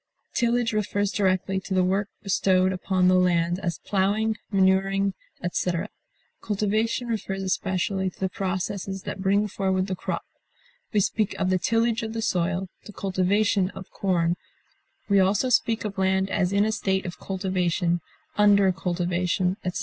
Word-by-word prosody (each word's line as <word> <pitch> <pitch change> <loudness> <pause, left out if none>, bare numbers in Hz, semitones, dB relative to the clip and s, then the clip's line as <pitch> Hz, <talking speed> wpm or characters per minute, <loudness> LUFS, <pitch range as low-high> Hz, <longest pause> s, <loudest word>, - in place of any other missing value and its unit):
Tillage 235 -1 +1
refers 205 -1 0
directly 190 -1 +1
to 190 0 -4
the 185 - +4
work 195 +3 0
bestowed 190 -1 +2
upon 185 0 +1
the 185 - +5
land, 175 -1 +2
as 170 -4 -2
plowing, 210 +3 +1 0.2
manuring, 195 0 +2 0.3
etc.; 175 +2 -1 0.5
cultivation 215 +3 0
refers 195 -4 -3
especially 190 0 -1
to - - -20
the 190 - +1
processes 190 +1 -3
that 190 - -5
bring 200 +2 +2
forward 190 -1 0
the 190 -1 -3
crop; - - -4 0.7
we 210 - +3
speak 210 +1 0
of 185 - 0
the 185 - +2
tillage 230 +2 +1
of 220 -1 -4
the 225 - -3
soil, 185 -2 0 0.2
the 210 - -10
cultivation 195 +1 +1
of 190 - -9
corn; 175 -3 0 0.7
we 200 -1 +4
also 200 +6 +2
speak 225 -2 +2
of 195 -2 -4
land 190 0 +1
as 185 -2 +1
in 200 +1 +3
a 220 - +1
state 190 -3 -1
of 175 - -6
cultivation, 180 -2 0 0.4
under 200 -2 +5
cultivation, 180 0 0
etc. 180 0 -2
190 Hz, 155 wpm, -25 LUFS, 185-205 Hz, 0.7 s, the